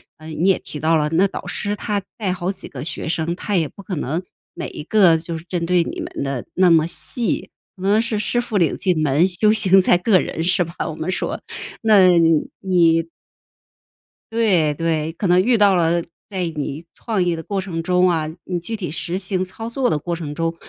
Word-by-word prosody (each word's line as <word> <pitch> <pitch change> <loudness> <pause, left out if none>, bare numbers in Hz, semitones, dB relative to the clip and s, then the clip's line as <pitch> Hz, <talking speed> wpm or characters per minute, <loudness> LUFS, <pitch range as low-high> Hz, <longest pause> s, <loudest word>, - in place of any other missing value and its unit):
呃， 155 - -13
你 160 +3 -1
也 195 - +4
提 150 - -8
到 160 +3 +2
了， 150 -1 +1
那 170 +5 +3
导 - - -7
师 205 0 -2
他 205 -1 -2 0.2
带 205 -5 -1
好 180 0 -3
几 - - -8
个 135 0 -7
学 165 - -3
生， 165 +1 -1
他 205 +2 -1
也 160 -3 +1
不 200 - -14
可 185 -2 -4
能 155 +6 -2 0.3
每 - - -5
一 - - -8
个 180 -2 +4
就 165 +1 -6
是 160 - -10
针 175 -1 -3
对 175 0 +3
你 - - -6
们 - - -5
的 135 -3 -3
那 185 -1 +4
么 160 -1 +4
细， 230 +6 -1 0.3
可 185 - -15
能 205 +3 +3
是 225 -2 -2
师 215 +3 0
傅 240 -3 -2
领 170 -6 +2
进 180 -5 0
门， 150 +5 +3
修 190 +3 +3
行 195 -3 +5
在 180 - +4
个 185 +1 +3
人， - - -4
是 180 +1 +2
吧？ 170 0 -9
我 160 - -5
们 160 +4 -3
说。 - - -3 0.4
那 210 -4 +6 0.5
你 170 -3 +3 1.3
对， 185 -10 +3
对， 160 0 -1
可 190 +4 -2
能 180 +1 +5
遇 240 0 +3
到 200 -2 +5
了 170 0 +2 0.3
在 190 -3 -3
你 145 +1 -4
创 215 -6 -1
业 175 -1 0
的 160 - -7
过 195 +1 -2
程 170 -3 -4
中 180 +1 +3
啊， 160 -3 0 0.2
你 180 -2 -2
具 200 +7 -4
体 190 -5 -5
实 170 +4 -3
行 185 -1 -1
操 225 +5 -6
作 250 +1 0
的 150 - 0
过 170 +3 -3
程 155 -3 -6
中， 165 +1 -2
180 Hz, 235 characters per minute, -20 LUFS, 165-195 Hz, 1.3 s, 那